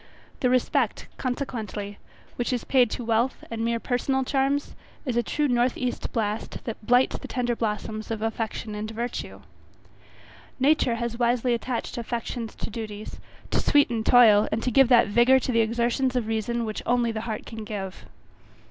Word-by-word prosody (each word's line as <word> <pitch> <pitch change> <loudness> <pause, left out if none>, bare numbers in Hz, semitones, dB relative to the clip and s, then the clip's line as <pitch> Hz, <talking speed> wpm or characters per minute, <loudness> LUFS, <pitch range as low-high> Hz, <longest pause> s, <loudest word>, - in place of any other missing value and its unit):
The 250 - +2
respect, 255 -1 +1
consequently, 220 -6 -4 0.4
which 240 - -1
is 245 -2 -1
paid 250 -4 +3
to 240 - -4
wealth 230 +3 +1
and 225 0 -2
mere 230 0 0
personal 265 +2 0
charms, 275 +2 0 0.3
is 250 -4 -1
a 240 - +3
true 295 +4 0
north 245 -1 +2
east 250 -1 -3
blast, 215 -2 -3
that 225 -2 -6
blights 245 +3 +3
the - - -8
tender 245 -2 -1
blossoms 215 -1 -3
of 220 -1 -3
affection 225 -1 -3
and 210 +1 -4
virtue. 235 +2 -5 1.2
Nature 265 -3 +3
has 235 0 -3
wisely 240 0 +2
attached 240 0 -3
affections 235 0 -4
to - - -5
duties, 215 -1 -7 0.3
to - - +2
sweeten 240 -6 +3
toil, 220 -4 +6
and 225 - -1
to 250 - 0
give 270 +2 +6
that 245 -2 +6
vigour 240 +5 +5
to 260 - -1
the 230 -1 +3
exertions 240 +3 0
of 245 -3 +1
reason 225 +2 -1
which 215 -1 -4
only 240 -1 +2
the 220 -1 -4
heart 215 - -4
can 225 -2 -7
give. 195 -3 -6
235 Hz, 170 wpm, -26 LUFS, 220-250 Hz, 1.2 s, toil